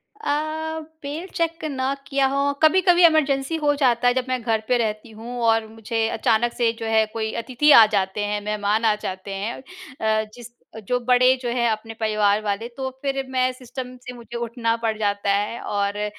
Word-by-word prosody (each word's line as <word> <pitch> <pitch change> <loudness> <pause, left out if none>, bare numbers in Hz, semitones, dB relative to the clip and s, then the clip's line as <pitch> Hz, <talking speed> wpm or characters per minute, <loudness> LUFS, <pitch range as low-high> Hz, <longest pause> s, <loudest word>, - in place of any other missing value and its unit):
अ, 315 -4 -2 0.3
mail 315 +6 -5
check 330 -2 -1
ना 265 0 -1
किया 275 -1 +1
हो, 280 +1 +1
कभी-कभी 355 +1 +5
इमरजेंसी 295 -2 +2
हो 290 - +4
जाता 245 -1 +3
है, 245 - +4
जब 255 -1 -1
मैं 255 -1 -1
घर 220 -2 0
पे 250 -1 +3
रहती 220 0 -3
हूँ 235 +3 -8
और 225 -1 +2
मुझे 225 0 -2
अचानक 230 +2 +1
से, 235 -2 +1
जो 225 - -4
है, 220 0 +3
कोई 220 -1 -2
अतिथि 285 +4 +3
आ 225 -4 +10
जाते 190 +2 -1
हैं, 205 0 -2
मेहमान 210 +1 0
आ 215 -1 +4
जाते 190 +1 -5
हैं 200 +4 -3
अ, 265 -10 -3
जिस 240 0 -12 0.2
अ, 220 - -6
जो 250 0 +1
बड़े 250 +1 +4
जो 240 - -2
हैं, 235 0 +1
अपने 225 +1 -4
परिवार 215 -1 +2
वाले, 205 +3 -2
तो 265 0 -3
फिर 275 -1 -2
मैं 255 0 +1
सिस्टम 255 0 -8
से 250 - -6
मुझे 235 0 -9
उठना 235 -1 -1
पड़ 225 -2 -2
जाता 205 -1 -1
है, 205 +4 -1
और 200 0 -2
अ, 210 - -1
235 Hz, 200 wpm, -23 LUFS, 220-270 Hz, 0.3 s, आ